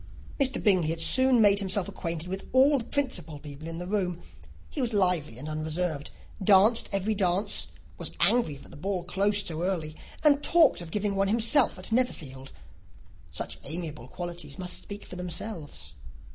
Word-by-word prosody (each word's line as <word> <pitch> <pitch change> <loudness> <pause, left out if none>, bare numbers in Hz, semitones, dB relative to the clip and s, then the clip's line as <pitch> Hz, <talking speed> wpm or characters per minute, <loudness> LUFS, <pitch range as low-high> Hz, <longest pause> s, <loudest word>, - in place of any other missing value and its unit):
Mr. 270 -1 +3
Bingley 185 -7 +3
had 165 0 -2
soon 260 +9 +5
made 200 -1 +5
himself 195 -1 0
acquainted 170 -1 -4
with 190 +2 -5
all 270 +2 +5
the - - -4
principal 250 - -2
people 145 +1 -10
in 165 0 -6
the 175 - -5
room: 180 -3 -1 0.5
he 290 - -5
was 240 -2 -1
lively 180 - +1
and 140 +4 -7
unreserved, 155 0 -2 0.3
danced 210 +4 +5
every 200 +2 0
dance, 190 0 +1 0.3
was - - -1
angry 230 - +2
that - - -14
the - - -12
ball 185 +2 -2
closed 200 +3 +1
so 160 -1 -3
early, 170 -4 -2 0.3
and 290 -2 +5
talked 320 - +4
of 170 - -8
giving 205 +3 -1
one 195 0 +1
himself 230 +3 +2
at 185 +4 -4
Netherfield. 140 - -1 0.8
Such - - -4
amiable 155 -4 -3
qualities 170 -2 -7
must 180 -1 -5
speak 205 0 -9
for 180 - -9
themselves. 165 - -4
185 Hz, 170 wpm, -28 LUFS, 160-210 Hz, 0.8 s, soon